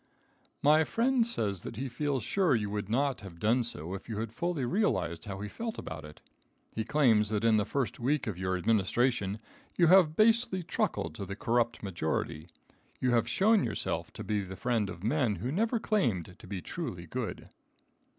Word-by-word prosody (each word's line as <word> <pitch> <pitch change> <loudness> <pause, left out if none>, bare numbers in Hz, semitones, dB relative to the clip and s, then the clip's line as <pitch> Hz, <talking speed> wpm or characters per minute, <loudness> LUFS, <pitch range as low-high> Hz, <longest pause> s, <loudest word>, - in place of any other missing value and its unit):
My 155 +2 +6
friend 235 - +2
says 100 - -1
that - - -7
he 135 +5 -3
feels 135 0 -1
sure 185 - +2
you 105 -3 -1
would 105 -1 -3
not 135 +2 +1
have 95 -4 -10
done 115 +7 +2
so 90 -6 -5
if 95 - -7
you 110 - -3
had 110 0 -4
fully 170 -2 -1
realized 120 - 0
how 100 -2 -5
he 105 - -3
felt 225 - -5
about 80 0 -6
it. 75 0 -12 0.5
He 110 - -1
claims 110 -5 +3
that 110 0 -1
in 115 -1 +5
the 105 - +1
first 135 -4 -2
week 135 +5 +1
of 105 - -3
your 95 +1 -1
administration 105 +2 +1 0.4
you 175 - +5
have 170 -5 +6
basely 220 -3 +3
truckled 115 - -1
to 100 - -6
the 100 - -5
corrupt 120 -1 0
majority. 80 -3 -2 0.5
You 125 - +1
have 120 -1 +2
shown 215 +2 +4
yourself - - -3
to - - -7
be 105 -1 0
the 95 -1 -7
friend 115 -1 0
of 90 -2 -8
men 120 -2 +1
who 115 +9 -3
never 225 - +1
claimed 110 - 0
to 105 - -12
be 95 -3 -5
truly - - -5
good. - - -5
115 Hz, 190 wpm, -30 LUFS, 100-150 Hz, 0.5 s, My